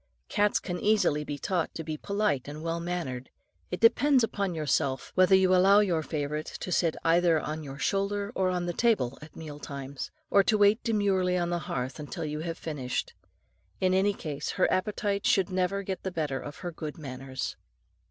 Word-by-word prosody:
Cats 205 Hz, -1 st, +2 dB
can 180 Hz, -2 st, -4 dB
easily 205 Hz, -8 st, +2 dB
be 145 Hz, -1 st, -5 dB
taught 175 Hz, +2 st, -1 dB
to 165 Hz, -, -4 dB
be 155 Hz, 0 st, -4 dB
polite 200 Hz, -6 st, -1 dB
and 150 Hz, +2 st, -7 dB
well 165 Hz, 0 st, -1 dB
mannered. 165 Hz, -8 st, -4 dB, 0.4 s
It 180 Hz, -, -3 dB
depends 250 Hz, +4 st, +5 dB
upon 200 Hz, -5 st, -1 dB
yourself, 140 Hz, -4 st, 0 dB
whether 185 Hz, +1 st, +5 dB
you 190 Hz, -1 st, +4 dB
allow 195 Hz, +2 st, +6 dB
your 175 Hz, -6 st, +1 dB
favourite 150 Hz, -1 st, -3 dB
to 180 Hz, -, -6 dB
sit 165 Hz, -2 st, +2 dB
either 165 Hz, -1 st, +4 dB
on 155 Hz, +1 st, -4 dB
your 140 Hz, -1 st, -8 dB
shoulder 200 Hz, +4 st, -1 dB
or 190 Hz, -4 st, +1 dB
on 180 Hz, -1 st, -1 dB
the 175 Hz, -, -2 dB
table 185 Hz, -, +1 dB
at 150 Hz, -, -12 dB
meal 150 Hz, -2 st, -8 dB
times, 140 Hz, -1 st, -6 dB, 0.2 s
or 200 Hz, -, +7 dB
to 215 Hz, +2 st, +2 dB
wait 205 Hz, +2 st, +4 dB
demurely 195 Hz, -5 st, +2 dB
on 175 Hz, -1 st, -1 dB
the 175 Hz, -, 0 dB
hearth 130 Hz, +4 st, -3 dB
till 165 Hz, -4 st, -4 dB
you 150 Hz, 0 st, -3 dB
have 165 Hz, +1 st, -4 dB
finished. 135 Hz, -6 st, -3 dB, 0.7 s
In 185 Hz, 0 st, +2 dB
any 195 Hz, +2 st, +3 dB
case, 150 Hz, -5 st, -4 dB
her -, -, +3 dB
appetite 200 Hz, +1 st, 0 dB
should 190 Hz, -1 st, +3 dB
never 185 Hz, +2 st, 0 dB
get 190 Hz, -1 st, -4 dB
the 190 Hz, -, -3 dB
better 150 Hz, -6 st, -2 dB
of 145 Hz, +1 st, -8 dB
her 175 Hz, -, -2 dB
good 155 Hz, -2 st, -6 dB
manners. 130 Hz, -3 st, -5 dB
175 Hz, 190 wpm, -28 LUFS, 150-195 Hz, 0.7 s, or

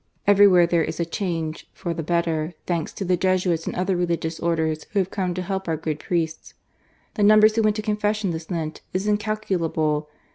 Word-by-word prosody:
Everywhere 200 Hz, -3 st, +6 dB
there 170 Hz, -1 st, +2 dB
is -, -, -4 dB
a 170 Hz, -, +1 dB
change 165 Hz, -3 st, -4 dB
for 175 Hz, -3 st, -4 dB
the 165 Hz, -, -4 dB
better, 165 Hz, 0 st, -1 dB
thanks 170 Hz, -3 st, -2 dB
to 195 Hz, -, -4 dB
the 180 Hz, 0 st, +2 dB
Jesuits 180 Hz, -2 st, 0 dB
and -, -, -3 dB
other 185 Hz, +1 st, 0 dB
Religious 170 Hz, -2 st, -1 dB
Orders 160 Hz, -2 st, -1 dB
who -, -, -1 dB
have 190 Hz, -1 st, +1 dB
come 185 Hz, -3 st, -2 dB
to 185 Hz, -, -3 dB
help 190 Hz, 0 st, -3 dB
our 160 Hz, -1 st, 0 dB
good 155 Hz, -1 st, -3 dB
priests. 165 Hz, -3 st, -3 dB, 0.6 s
The 215 Hz, -, -3 dB
numbers 215 Hz, +1 st, +6 dB
who 225 Hz, -, +3 dB
went 215 Hz, -1 st, +2 dB
to 215 Hz, -, -3 dB
confession 210 Hz, -2 st, 0 dB
this 160 Hz, -1 st, -6 dB
Lent 160 Hz, -3 st, -4 dB
is 190 Hz, +2 st, 0 dB
incalculable. 180 Hz, -8 st, 0 dB
175 Hz, 195 wpm, -23 LUFS, 165-200 Hz, 0.6 s, Everywhere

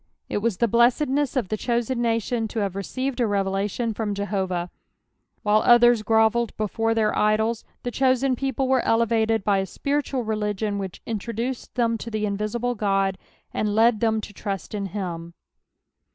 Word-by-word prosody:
It -, -, -1 dB
was 215 Hz, -3 st, -1 dB
the 235 Hz, -, +2 dB
blessedness 260 Hz, +5 st, +2 dB
of 240 Hz, -8 st, 0 dB
the 215 Hz, -, -1 dB
chosen 240 Hz, +2 st, -1 dB
nation 230 Hz, 0 st, 0 dB
to 225 Hz, -, -4 dB
have 195 Hz, -2 st, -2 dB
received 255 Hz, +7 st, -3 dB
a 240 Hz, -, +2 dB
revelation 200 Hz, +3 st, -1 dB
from 210 Hz, -1 st, -2 dB
JehoTah. 190 Hz, -3 st, -2 dB, 0.7 s
While 210 Hz, +1 st, +4 dB
others 240 Hz, -1 st, +6 dB
grovelled 225 Hz, +1 st, +2 dB
before 225 Hz, +2 st, 0 dB
their 220 Hz, -1 st, +1 dB
idols, 220 Hz, +2 st, +1 dB, 0.2 s
the 245 Hz, -, -3 dB
chosen 260 Hz, 0 st, +2 dB
people 270 Hz, 0 st, -1 dB
were 260 Hz, -1 st, +3 dB
elevated 225 Hz, -1 st, +2 dB
by 200 Hz, -1 st, +2 dB
a 190 Hz, -, -2 dB
spiritual 280 Hz, 0 st, -2 dB
leligiou 210 Hz, -1 st, -1 dB
whieh 190 Hz, -2 st, -6 dB
introduced 230 Hz, +3 st, -4 dB
them 230 Hz, -2 st, +1 dB
to 230 Hz, -, -6 dB
the 215 Hz, -1 st, -3 dB
inviMble 215 Hz, +4 st, -2 dB
God, 195 Hz, -2 st, +1 dB, 0.3 s
and 210 Hz, -1 st, -1 dB
led 225 Hz, 0 st, +4 dB
them 220 Hz, -1 st, +1 dB
to 205 Hz, -, -9 dB
trust 195 Hz, 0 st, -5 dB
in 200 Hz, -2 st, -2 dB
him. 170 Hz, -4 st, -5 dB
220 Hz, 165 wpm, -24 LUFS, 205-240 Hz, 0.7 s, others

